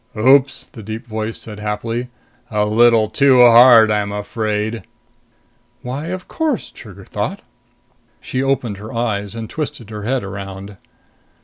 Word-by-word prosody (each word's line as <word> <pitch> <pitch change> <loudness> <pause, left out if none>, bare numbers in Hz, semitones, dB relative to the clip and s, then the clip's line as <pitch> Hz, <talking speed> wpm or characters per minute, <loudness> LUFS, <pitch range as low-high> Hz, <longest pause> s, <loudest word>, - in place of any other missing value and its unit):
"Oops!" 135 +4 +3
the 115 - -11
deep 110 +3 -7
voice 110 -1 -4
said 105 -2 -7
happily. 115 +4 -3 0.4
"A 105 -2 0
little 115 +1 +4
too 130 +4 +4
hard, 120 -2 +8
I'm 105 -1 0
afraid!" 105 +1 -3 1.0
Why, 135 +5 -5
of 185 +1 -6
course, 315 -6 -2
Trigger 100 -4 -13
thought. 185 - -4 0.8
She 130 - -3
opened 135 -6 -1
her 105 +2 -9
eyes 105 -3 -2
and 115 -1 -5
twisted 120 -6 -6
her 105 -1 -6
head 125 +3 -1
around. 100 0 -8
110 Hz, 135 wpm, -18 LUFS, 105-125 Hz, 1.0 s, hard